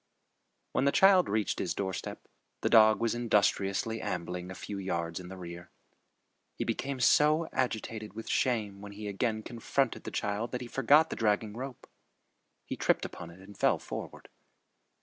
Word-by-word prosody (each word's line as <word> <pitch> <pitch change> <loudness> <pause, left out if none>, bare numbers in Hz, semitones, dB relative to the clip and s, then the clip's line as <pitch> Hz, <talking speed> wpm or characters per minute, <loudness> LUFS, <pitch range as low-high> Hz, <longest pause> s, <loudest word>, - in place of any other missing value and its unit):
When 135 - +1
the 140 - +4
child 190 +1 +5
reached 105 0 0
his 85 -2 -1
doorstep, 95 -2 -4 0.3
the - - 0
dog 110 -2 +7
was 115 -1 +1
industriously 110 -1 +1
ambling 90 +1 -4
a 95 - -7
few 100 +1 -6
yards 85 -3 -2
in 90 - -9
the 95 +1 -8
rear. 85 -1 -9 0.9
He - - -2
became 140 -1 -2
so 155 +5 +4
agitated 110 -4 -2
with 115 - -7
shame 105 -6 0
when 100 0 -9
he 105 +1 -7
again 110 +2 -1
confronted 120 +3 -1
the - - -5
child 105 +4 -2
that 125 - -2
he - - -5
forgot 145 +6 +4
the - - -2
dragging 105 -1 +1
rope. 130 +1 -7 0.8
He - - -4
tripped - - +1
upon 85 -2 -8
it 85 +3 -14
and 100 +1 -13
fell - - +3
forward. - - -7
110 Hz, 170 wpm, -30 LUFS, 95-120 Hz, 0.9 s, dog